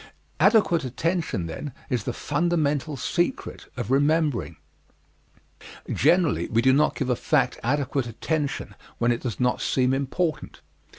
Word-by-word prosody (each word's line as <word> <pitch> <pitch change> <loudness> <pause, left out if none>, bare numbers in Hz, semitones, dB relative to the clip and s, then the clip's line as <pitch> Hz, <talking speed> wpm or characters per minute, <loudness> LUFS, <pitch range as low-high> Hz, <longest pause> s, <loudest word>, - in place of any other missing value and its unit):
Adequate 195 -3 +4
attention, 145 - -1
then, 115 - -6
is 120 -5 -2
the - - -1
fundamental 150 0 0
secret 175 - -2
of 120 -1 -3
remembering. 140 - +1 1.4
Generally 165 +2 +3
we 115 +1 +1
do 130 0 +5
not 150 +3 +3
give 135 -3 -1
a - - +2
fact - - +1
adequate 135 0 0
attention 145 +5 -3 0.2
when 120 0 +2
it 120 - -1
does 120 -5 -4
not 125 0 +1
seem 130 0 +1
important. 145 +5 -2
140 Hz, 130 wpm, -25 LUFS, 125-160 Hz, 1.4 s, do